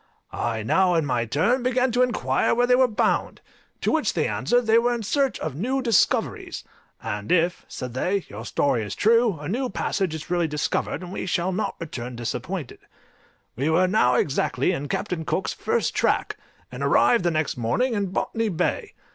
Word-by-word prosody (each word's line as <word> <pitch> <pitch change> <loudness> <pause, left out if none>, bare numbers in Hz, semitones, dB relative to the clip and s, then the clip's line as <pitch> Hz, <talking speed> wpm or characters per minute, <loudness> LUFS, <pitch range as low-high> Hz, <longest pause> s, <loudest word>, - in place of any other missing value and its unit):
I 115 -2 -2
now 180 - +3
in 165 -2 +2
my 125 -4 0
turn 180 - +1
began 255 +1 +1
to 245 +2 +2
inquire 135 - +1
where 245 +1 +3
they 250 - +3
were 255 +1 +5
bound? 220 - 0 0.4
To - - +1
which - - +1
they - - +1
answered, 245 0 +1
they 225 0 +4
were 240 +1 +1
in 230 - -4
search 270 +5 +1
of 155 - -3
new 245 - -1
discoveries; 230 -7 +1 0.4
"and 105 -2 -4
if," 175 0 +1
said 125 -2 -6
they, 180 +9 -1
"your 105 +2 -8
story 120 -1 0
is 105 -2 -5
true, 230 -3 +3
a 145 - -6
new 250 +7 -1
passage 190 -3 -1
is 160 +2 -8
really 175 -2 +2
discovered, 150 +4 -2
and 180 - -8
we - - -4
shall 180 +1 0
not 200 +1 -2
return 125 -7 -6
disappointed." 125 +7 -5 0.8
We 140 +6 0
were 170 +3 +4
now 180 -10 +3
exactly 135 +1 +1
in 145 -5 -3
Captain 160 +4 -3
Cook's 185 - -2
first 465 +1 -1
track, - - +1 0.4
and - - -7
arrived 235 -6 +4
the 175 - +2
next 155 -3 -1
morning 180 - 0
in 200 -2 0
Botany 225 +4 -1
Bay. 170 - -2
180 Hz, 190 wpm, -24 LUFS, 140-230 Hz, 0.8 s, were